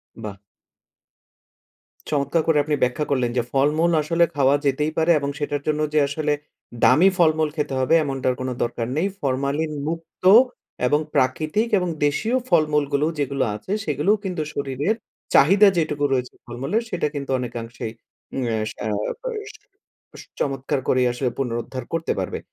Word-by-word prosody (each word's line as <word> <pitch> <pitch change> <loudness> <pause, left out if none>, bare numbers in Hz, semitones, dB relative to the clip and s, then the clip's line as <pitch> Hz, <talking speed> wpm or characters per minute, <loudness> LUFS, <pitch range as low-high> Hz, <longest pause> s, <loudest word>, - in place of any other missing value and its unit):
বাহ! 105 -3 -7 1.8
চমৎকার 145 +3 +1
করে 160 -2 +4
আপনি 150 0 0
ব্যাখ্যা 125 +4 0
করলেন 125 -3 +1
যে - - +4
ফলমূল 150 +5 +2
আসলে 165 +3 +2
খাওয়া 140 0 +4
যেতেই 150 +3 +1
পারে 165 +1 +3
এবং 140 0 -2
সেটার 145 -1 -2
জন্য 155 0 +1
যে 155 - +4
আসলে 150 +1 -1 0.5
দামি 150 +11 +6
ফলমূল 155 -2 +3
খেতে 145 -3 -2
হবে 130 +5 +2
এমনটার 135 -3 -1
কোনো 130 0 -2
দরকার 120 -1 -3
নেই। 175 +5 +2
ফরমালিন 140 +3 -1
মুক্ত 165 +1 -6 0.6
এবং 150 +2 +3 0.2
প্রাকৃতিক 155 - +1
এবং 180 -2 -1 0.2
দেশীয় 220 - +1
ফলমূলগুলো 150 -3 +2
যেগুলো 140 -1 0
আছে, 105 - -8
সেগুলোও 210 +2 +2
কিন্তু 180 -4 -3
শরীরের 140 - -1 0.4
চাহিদা 195 +8 +7
যেটুকু 150 -3 0
রয়েছে 125 -1 -1
ফলমূলের, 135 - -2
সেটা 170 -6 -1
কিন্তু 140 -1 -5
অনেকাংশেই 115 -2 -5
অ্যা 120 -4 -5 0.2
সা - - -7 0.4
প - - -57 0.9
বেশ - - -11 0.2
চমৎকার 135 0 -1
করেই 130 -1 +3
আসলে 125 +1 -1
পুনরুদ্ধার 125 0 -3
করতে 165 0 -1
পারবে। - - -3
145 Hz, 145 wpm, -23 LUFS, 130-160 Hz, 1.8 s, চাহিদা